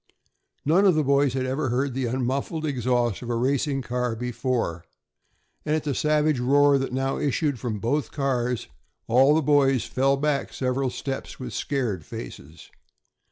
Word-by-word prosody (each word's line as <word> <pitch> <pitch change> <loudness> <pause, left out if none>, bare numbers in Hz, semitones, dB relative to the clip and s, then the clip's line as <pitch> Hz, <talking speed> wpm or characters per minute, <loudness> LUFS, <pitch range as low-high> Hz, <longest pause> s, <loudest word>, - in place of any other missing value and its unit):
None 170 +7 +4
of 180 - +4
the 155 - +2
boys 140 -1 +2
had 130 -1 -1
ever 130 +1 -1
heard 130 +2 0
the 130 -1 -1
unmuffled 130 +6 -2
exhaust 125 -5 0
of 120 - -7
a 120 - 0
racing 135 +2 0
car 125 -1 -2
before, 120 -7 -2 0.8
and 155 0 0
at 155 - -1
the 145 -2 -1
savage 150 -1 +2
roar 140 +2 +4
that 135 - -3
now 135 +1 -1
issued 145 -2 0
from 115 -3 -3
both 140 +8 -1
cars 125 -4 -1 0.4
all 130 +5 +5
the 160 - +2
boys 135 -3 +3
fell 135 +1 +1
back 145 0 -1
several 130 0 -1
steps 135 +2 -5
with 130 - -6
scared 120 - -2
faces. 70 +4 -10
135 Hz, 160 wpm, -25 LUFS, 125-145 Hz, 0.8 s, all